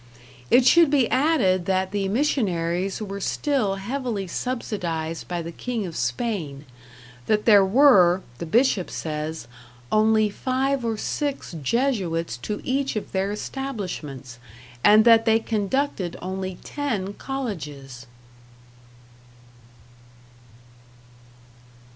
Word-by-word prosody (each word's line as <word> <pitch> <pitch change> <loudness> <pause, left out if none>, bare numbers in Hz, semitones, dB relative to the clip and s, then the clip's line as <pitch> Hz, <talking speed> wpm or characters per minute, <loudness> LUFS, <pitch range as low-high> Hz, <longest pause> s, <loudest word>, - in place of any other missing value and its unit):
It 250 0 +5
should 335 +3 +6
be 275 -5 +3
added 255 - +2
that 190 0 0
the 200 -1 -1
missionaries 195 - 0
were 200 -1 -6
still 255 -5 0
heavily 230 0 -3
subsidized 170 -7 -4
by 175 -1 -3
the 165 - -6
King 230 +3 -4
of 170 -3 -7
Spain, 140 - -3 0.6
that 210 -1 +1
there 205 -3 +7
were 190 -5 +5 0.2
(the 170 - -5
Bishop 220 -1 +2
says) 155 -3 -5 0.4
only 215 0 +4
five 260 +4 -1
or 225 -2 -1
six 285 +4 -3
Jesuits 175 - 0
to 210 - -5
each 270 0 -1
of 215 - -4
their 190 +1 -1
establishments, 180 - -6 0.4
and 215 +2 +6
that 230 -1 +6
they 225 0 +4
conducted 220 -3 -2
only 185 0 -5
ten 220 -10 -3
colleges. 145 - -6
205 Hz, 105 wpm, -24 LUFS, 175-250 Hz, 0.6 s, there